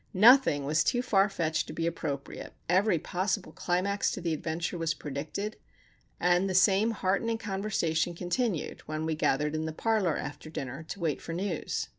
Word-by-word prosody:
Nothing 215 - +6
was 150 +2 +2
too 245 -1 +1
far 200 -4 +3
fetched 160 -5 -1
to - - -7
be 165 - -2
appropriate, 150 -4 -4
every 185 +1 +3
possible 185 +5 -2
climax 190 +3 0
to - - -4
the 170 -2 -1
adventure 160 +3 -3
was 165 -1 -1
predicted, 155 +9 -5 0.6
and 180 +2 +3
the 185 - -1
same 195 +3 +5
heartening 225 +2 0
conversation 190 -6 -1
continued 180 - -2
when 155 0 -3
we 160 - 0
gathered 150 0 +1
in 155 0 -1
the 160 - -2
parlour 200 -1 +1
after 145 +1 -6
dinner 135 -2 -5
to 200 - -5
wait 160 -5 -1
for 165 - -6
news. 180 -1 -2
175 Hz, 170 wpm, -29 LUFS, 160-200 Hz, 0.6 s, Nothing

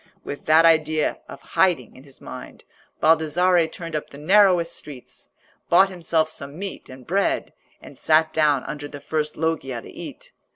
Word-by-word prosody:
With 145 - -7
that 160 +2 +5
idea 155 -1 +2
of 140 - -10
hiding 175 - +1
in 130 - -15
his 135 - -14
mind, - - -10 0.4
Baldassarre 165 +2 +3
turned 165 0 -7
up 150 - -4
the 140 - -12
narrowest 180 +1 +3
streets, 140 -5 -12 0.4
bought 190 +3 +5
himself 165 -3 0
some 145 -1 -8
meat 195 +1 -7
and 130 -1 -12
bread, 195 +3 -1 0.3
and - - -14
sat 155 0 +3
down 150 -4 +2
under 145 -1 -6
the 145 0 -10
first 150 0 -3
loggia 150 -6 -2
to - - -12
eat. - - -10
155 Hz, 165 wpm, -23 LUFS, 145-170 Hz, 0.4 s, that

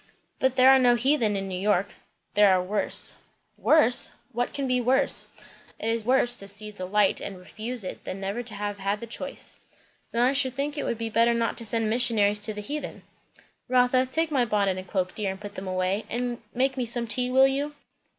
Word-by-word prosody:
"But 260 -1 +1
there 260 0 +7
are 265 - +6
no 245 -1 +4
heathen 240 -4 +2
in 195 0 -3
New 185 -1 -4
York." 200 -1 0 0.4
"There 205 -1 +5
are 185 - +3
worse." 200 +3 +1 0.4
"Worse? 295 -6 +4 0.2
what 245 0 -2
can 280 - -3
be 255 -1 +1
worse?" 265 +3 +2 0.5
"It 225 - -3
is 230 -1 -1
worse 245 -1 +2
to 200 - -4
see 210 +1 -2
the 185 -3 -7
light 205 0 +2
and 195 - -6
refuse 220 +5 -4
it, 185 - -7
than 190 - -6
never 200 +4 -3
to 230 -3 -8
have 205 0 -4
had 200 +2 -1
the 235 - -7
choice." 230 - -7 0.5
"Then 235 +1 +1
I 255 +2 +3
should 260 -2 +1
think 285 +2 -2
it 290 - -3
would 235 - -2
be 225 0 -4
better 230 +2 +3
not 230 0 -1
to 230 - -6
send 225 0 +1
missionaries 215 -3 +2
to 215 +1 0
the 210 - -5
heathen." 295 +8 -6 0.6
"Rotha, 255 +1 +3
take 320 +5 -1
my 265 -4 +2
bonnet 200 -4 0
and 185 - -10
cloak, 185 -1 -2
dear, 210 -2 -2
and 190 0 -6
put 205 0 -9
them 190 +1 -7
away; 185 +3 -1
and 240 0 -3
make 265 +3 0
me 250 - -1
some 235 +1 0
tea, 250 +3 +1
will 265 +1 +5
you?" 285 +2 -1
230 Hz, 220 wpm, -26 LUFS, 205-255 Hz, 0.6 s, there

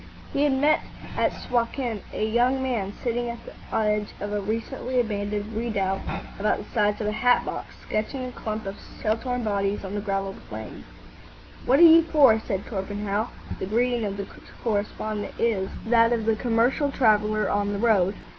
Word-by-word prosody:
He 285 - +3
had 290 - +3
met 290 +3 +3 0.3
at - - +2
Suakin 235 -2 -2
a 215 - -1
young 245 +4 +2
man, 225 -7 -1
sitting 240 0 -1
on 235 - -4
the - - -10 0.2
edge 210 -1 +1
of 205 +1 -4
a 205 - 0
recently 230 +4 -2
abandoned 210 -1 -2
redoubt 205 -4 -1 0.4
about 210 +1 +2
the - - -6
size 210 -2 +2
of - - -1
a 210 - +1
hat 245 +3 +3
box, - - -6
sketching 255 +5 -2
a 250 - -5
clump 215 -3 -5
of 195 +1 -6 0.2
shell 215 0 +1
torn 245 +1 -3
bodies 200 -1 -1
on 190 - -5
the 205 - -2
gravel 195 -1 -2 0.2
plain. - - -8 0.8
"What 265 - +5
are 345 - +7
you 330 0 +9
for?" 290 -9 +5
said 195 -3 -3
Torpenhow. 205 +1 -2 0.3
The - - -3
greeting 240 +2 +1
of 200 -1 -3
the 200 - -3 0.4
correspondent 215 -1 -2
is 205 -5 +1 0.2
that 230 0 +4
of 230 -2 0
the 225 0 +3
commercial 240 +5 +2
traveller 215 -4 +3
on 205 0 0
the 205 - -2
road. 200 -3 +3
220 Hz, 180 wpm, -25 LUFS, 205-240 Hz, 0.8 s, you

